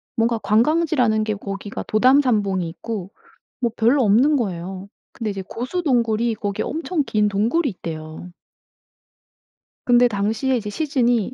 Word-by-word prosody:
뭔가 230 0 +1
관광지라는 245 -2 +2
게 215 - -1
거기가 200 +1 -6
도담산봉이 215 -7 +2
있고 200 +1 -6 0.5
뭐 235 -2 +1
별로 245 +4 +3
없는 255 +9 +4
거예요. 190 -2 -4 0.3
근데 220 -3 -3
이제 195 -1 -5
고수 255 +10 -4
동굴이 235 -5 +1
거기에 205 -3 -3
엄청 315 +3 -2
긴 210 -1 +1
동굴이 230 +11 +1
있대요. 160 -1 -8 1.5
근데 245 0 +5
당시에 220 +5 0
이제 210 -3 -3
시즌이 245 - 0
225 Hz, 300 characters per minute, -21 LUFS, 200-255 Hz, 1.5 s, 근데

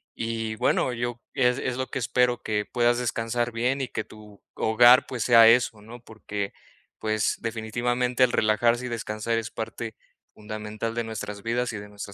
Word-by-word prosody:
y, 115 -1 -3
bueno, 125 - +1
yo 120 0 -3
es 125 0 +2
es 125 -1 -2
lo 130 0 -2
que - - -5
espero 125 0 +1
que 105 -1 -1
puedas 120 0 +2
descansar 120 0 -1
bien 125 +4 0
y 130 - -2
que 115 - -3
tu 105 -2 -15
hogar, 120 +4 +6
pues 125 -4 -3
sea 115 -2 +7
eso, 115 -2 +3
¿no?, 115 +3 -11
porque, 105 -3 -6 0.5
pues, 110 -1 0
definitivamente 120 +3 0
el 125 - +4
relajarse 115 +3 +2
y - - -5
descansar 115 0 -2
es 115 0 -6
parte 110 0 -6 0.4
fundamental 110 +1 -5
de 120 - -1
nuestras 105 -2 -6
vidas 120 +1 -1
y - - -4
de 105 0 -9
nuestra 100 -1 -8
115 Hz, 180 wpm, -26 LUFS, 110-120 Hz, 0.5 s, sea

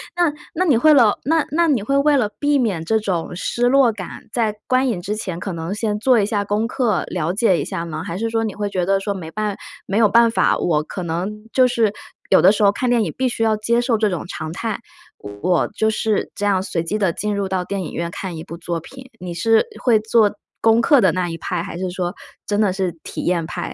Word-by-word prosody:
那 350 -3 +2 0.2
那 365 +3 +1
你 290 -9 +4
会 310 +6 +6
了 235 -7 +5
那 320 +2 +2
那 335 +3 +2
你 275 -8 +2
会 275 +7 0
为 290 +1 +4
了 240 -7 +1
避 290 -1 +2
免 200 -10 0
这 220 +6 +2
种 180 -5 -3
失 240 +6 0
落 265 -2 +5
感， 200 -5 -9
在 220 -3 0
观 255 +1 +2
影 215 -8 -1
之 205 +4 -3
前 185 -5 -5
可 195 - -4
能 165 +3 -4
先 210 0 -1
做 250 +1 +4
一 200 - +2
下 205 -1 -1
功 210 +3 0
课 235 -6 0
了 175 -1 -2
解 195 -4 +2
一 - - -2
下 185 -4 -4
吗？ 160 -1 -5
还 170 -2 -5
是 225 +1 -1
说 225 0 0
你 215 -3 -3
会 205 +1 -3
觉 185 -3 -1
得 195 +1 +2
说 200 +1 -2
没 165 -4 -7
办 210 +1 -2 0.3
没 200 - -1
有 225 -1 +5
办 230 +3 +5
法， 225 - +2
我 155 -3 +1
可 185 - -7
能 185 +6 -4
就 255 -1 +4
是， 230 -4 +1 0.4
有 190 - +6
的 185 - +7
时 210 0 0
候 200 - +6
看 250 +5 -2
电 235 -2 +3
影 - - -3
必 260 - +1
须 240 - -4
要 220 -1 +2
接 235 +3 +1
受 240 -2 +1
这 215 -1 +1
种 175 - -3
常 155 -3 -5
态。 220 +4 -3 0.6
我 180 -2 +1
就 220 +1 0
是 220 -1 -1
这 205 - -3
样 195 -2 +2
随 170 -3 -2
机 185 +6 -2
地 190 -5 +1
进 210 +4 -2
入 200 -1 -1
到 190 -1 -1
电 195 +2 -3
影 - - -7
院 170 0 -3
看 185 0 -5
一 160 - -7
部 170 -1 -9
作 170 -1 -4
品， 260 +8 -13
你 180 -1 -5
是 225 +6 +3 0.2
会 235 -3 +4
做 215 -1 +2 0.2
功 225 +1 +4
课 285 +4 +5
的 190 -7 +3
那 180 -1 -1
一 165 - -5
派， 170 0 -3
还 180 -2 -7
是 185 0 -3
说 180 0 -3 0.3
真 205 0 -1
的 205 -4 +2
是 190 -2 -1
体 - - -6
验 170 -2 0
派？ 170 - -5
210 Hz, 275 characters per minute, -20 LUFS, 180-230 Hz, 0.6 s, 的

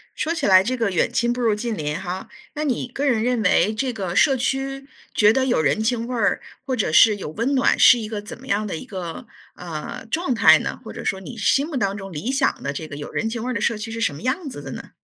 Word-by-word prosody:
说 325 - -1
起 335 - -2
来 190 -1 +6
这 255 +5 -1
个” 225 -4 0
远 180 - +1
亲 240 0 +1
不 245 - -4
如 220 -3 +2
近 230 +1 -3
邻 150 -3 -3
“哈， 185 +2 -5 0.3
那 300 0 -3
你 255 -2 -1
个 270 +4 -3
人 230 -5 +2
认 245 -2 +1
为 205 +1 +3
这 255 +2 -2
个 190 -5 -4
社 275 +5 +5
区 270 +1 -2 0.3
觉 210 0 +5
得 260 +3 +1
有 245 -10 +2
人 145 +7 +1
情 230 0 0
味 250 - -4
儿， 210 -4 +1 0.2
或 260 -1 -1
者 205 -9 0
是 210 +7 +6
有 195 - -6
温 230 - -1
暖， 260 - +3
是 250 - +8
一 220 -2 -4
个 215 -2 -4
怎 210 - -9
么 260 +2 -14
样 210 -3 0
的 195 - -4
一 160 - -7
个， 185 +4 -6 0.3
呃， 165 +3 -7
状 320 -6 0
态 - - +7
呢？ - - -4
或 - - -8
者 - - -7
说 190 - -1
你 235 +4 -9
心 270 +7 +2
目 310 -5 -4
当 200 -5 0
中 195 -1 -8
理 175 - -3
想 270 0 0
的 140 - -3
这 155 +2 -6
个 145 - -8
有 145 - -7
人 225 - -1
情 230 0 -4
味 250 - -3
儿 - - -2
的 210 - -2
社 225 0 +1
区 215 +2 -6
是 230 0 -5
什 185 - +1
么 140 - -10
样 280 +5 -1
子 145 - -8
的 135 -1 -8
呢？ - - -9
225 Hz, 305 characters per minute, -22 LUFS, 190-255 Hz, 0.3 s, 是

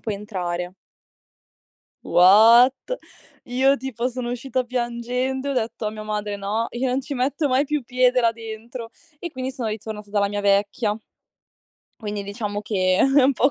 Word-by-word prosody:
puoi 215 -3 -3
entrare" 180 -3 -4 1.3
What? 225 +8 +7 0.7
Io 265 +2 +2
tipo, 245 -1 -3
sono 250 -1 -4
uscita 250 +1 -2
piangendo 250 +2 -2
e - - 0
ho 275 - -1
detto 225 -2 -2
a 210 - -1
mia 215 0 -8
madre: 210 -1 -3
"No, 205 +3 -2
io 250 +2 -2
non 255 +2 0
ci 285 - -7
metto 275 +4 0
mai 260 +2 +2
più 300 -1 -1
piede 250 0 +3
là 230 -1 +3
dentro." 230 +1 -8 0.3
E 345 - -6
quindi 260 -2 -4
sono 250 -4 -3
ritornata 215 -1 -6
dalla 200 -1 +1
mia 205 0 -3
vecchia. 205 +2 +1 1.0
Quindi, 210 -2 -5
diciamo 205 0 -4
che 185 -3 +1
è 270 +1 +5
un 270 +2 +4
po' 265 +4 +3
230 Hz, 165 wpm, -23 LUFS, 210-255 Hz, 1.3 s, What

